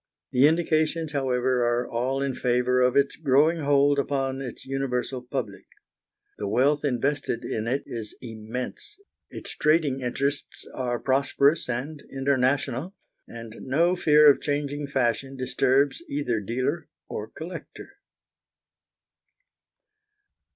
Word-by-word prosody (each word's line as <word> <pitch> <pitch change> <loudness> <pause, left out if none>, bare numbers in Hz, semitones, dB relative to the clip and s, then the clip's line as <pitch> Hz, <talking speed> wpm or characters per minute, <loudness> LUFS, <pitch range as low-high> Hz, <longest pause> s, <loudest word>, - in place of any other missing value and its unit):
The 130 +3 +6
indications, 160 -1 +1
however, 130 -3 +1
are 120 +1 +1
all 130 +4 -1
in 135 -1 -1
favour 125 0 +1
of 125 0 +3
its 140 0 +3
growing 155 +3 +3
hold 145 -1 +3
upon 135 -1 -1
its 125 -3 -7
universal 130 -1 -2
public. 115 -7 -5 0.7
The 100 - -2
wealth 135 +8 +2
invested 140 -1 -1
in 110 +1 -3
it 135 +4 0
is 110 -3 -6
immense, 120 - -7 0.3
its - - -7
trading 150 -4 +2
interests 140 +3 -2
are 125 -2 -2
prosperous 140 +3 +2
and 140 +5 -4
international, 135 - 0 0.3
and 115 -1 -9
no 170 +7 +2
fear 150 -3 +5
of 145 - +6
changing 145 0 -2
fashion 135 0 -1
disturbs 130 +3 +1
either 130 -6 -1
dealer 130 - -2 0.2
or 105 - -5
collector. 165 +8 -9
135 Hz, 115 wpm, -26 LUFS, 125-145 Hz, 0.7 s, The